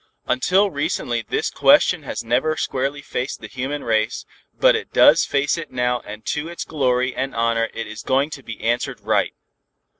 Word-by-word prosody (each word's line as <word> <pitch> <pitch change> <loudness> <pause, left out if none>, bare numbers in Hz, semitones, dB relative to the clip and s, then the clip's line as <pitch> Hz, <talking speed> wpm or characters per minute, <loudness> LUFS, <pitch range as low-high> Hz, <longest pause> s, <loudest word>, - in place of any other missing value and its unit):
"Until 190 +10 +2
recently 120 -4 -1
this 110 - -2
question - - +4
has - - -5
never 130 +7 +1
squarely 140 +2 -2
faced 125 +3 -4
the - - -9
human 135 +3 -4
race, 110 -1 0 0.3
but - - +4
it - - -4
does - - +6
face 145 +4 0
it 165 - -7
now 125 -1 0
and 105 0 -10
to 150 +2 -2
its 170 - -6
glory 130 -4 0
and 135 +1 -3
honor 115 0 +1
it 115 - -5
is 110 0 -8
going 135 +3 +1
to 135 - -7
be 115 -4 -8
answered 120 +2 -1
right. - - 0
130 Hz, 180 wpm, -21 LUFS, 115-145 Hz, 0.3 s, does